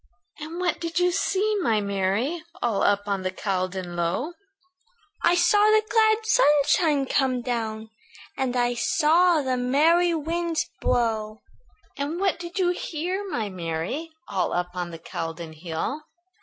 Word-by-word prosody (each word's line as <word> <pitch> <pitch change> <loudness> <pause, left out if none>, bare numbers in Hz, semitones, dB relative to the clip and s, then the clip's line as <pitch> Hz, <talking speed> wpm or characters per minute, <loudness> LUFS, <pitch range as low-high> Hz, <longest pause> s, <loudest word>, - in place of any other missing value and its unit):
"And 320 +3 -6
what 360 -1 -1
did 335 0 -3
you 360 0 +3
see, 405 +3 +1
my 225 - +2
Mary, 200 - -1 0.2
All 225 -5 0
up 205 0 +2
on 200 -1 -1
the 185 - -1
Caldon 185 -2 -3
Low?" 175 - -1 0.9
"I 350 - +4
saw 385 +4 +4
the 430 0 +5
glad 440 -1 +3
sunshine 295 - +3
come 255 -2 0
down, 220 -3 -3 0.4
And 255 -2 -1
I 245 0 +2
saw 315 +6 +3
the 260 -1 0
merry 325 +8 +3
winds 330 +1 -1
blow." 220 -2 0 0.5
"And 290 +5 -3
what 385 -3 +1
did 345 +2 -7
you 365 -2 +2
hear, 360 +3 -3
my 225 - -2
Mary, 180 - -4 0.2
All 195 -2 -1
up 175 0 -1
on 180 -1 -4
the 165 - -8
Caldon 165 0 -6
hill?" 165 - -4
265 Hz, 145 wpm, -25 LUFS, -, 0.9 s, the